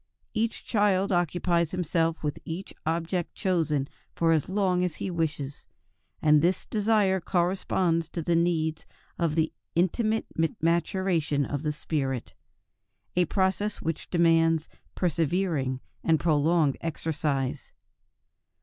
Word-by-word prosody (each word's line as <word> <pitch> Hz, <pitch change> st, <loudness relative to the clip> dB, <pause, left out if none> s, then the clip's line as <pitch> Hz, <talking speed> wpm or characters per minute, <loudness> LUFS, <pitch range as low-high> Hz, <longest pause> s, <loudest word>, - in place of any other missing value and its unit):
Each 225 Hz, +1 st, -1 dB
child 200 Hz, -3 st, +2 dB
occupies 175 Hz, -1 st, +1 dB
himself 165 Hz, -2 st, 0 dB
with 150 Hz, -1 st, -2 dB
each 170 Hz, +4 st, -6 dB
object 170 Hz, +2 st, -1 dB
chosen 160 Hz, -7 st, 0 dB, 0.3 s
for 165 Hz, -1 st, +2 dB
as 160 Hz, -1 st, +1 dB
long 185 Hz, -2 st, +1 dB
as 180 Hz, -3 st, -1 dB
he 190 Hz, -, -4 dB
wishes; 155 Hz, -4 st, -3 dB, 0.6 s
and 150 Hz, -1 st, +6 dB
this 175 Hz, +3 st, +1 dB
desire 210 Hz, -3 st, +2 dB
corresponds 175 Hz, -2 st, +1 dB
to 170 Hz, -, -4 dB
the 170 Hz, +2 st, +1 dB
needs 160 Hz, -2 st, 0 dB, 0.3 s
of 165 Hz, -3 st, +1 dB
the 160 Hz, -1 st, +1 dB, 0.2 s
intimate 215 Hz, +6 st, +1 dB, 0.3 s
maturation 165 Hz, -3 st, +1 dB
of 145 Hz, 0 st, -3 dB
the 150 Hz, -1 st, -1 dB
spirit, 135 Hz, -5 st, -3 dB, 0.8 s
a 180 Hz, 0 st, +4 dB
process 195 Hz, +4 st, 0 dB
which 165 Hz, -1 st, -3 dB
demands 165 Hz, -2 st, +3 dB, 0.3 s
persevering 160 Hz, -5 st, 0 dB, 0.2 s
and 160 Hz, -2 st, +3 dB
prolonged 155 Hz, -2 st, +2 dB
exercise. 150 Hz, -4 st, -2 dB
165 Hz, 115 wpm, -27 LUFS, 155-185 Hz, 0.8 s, and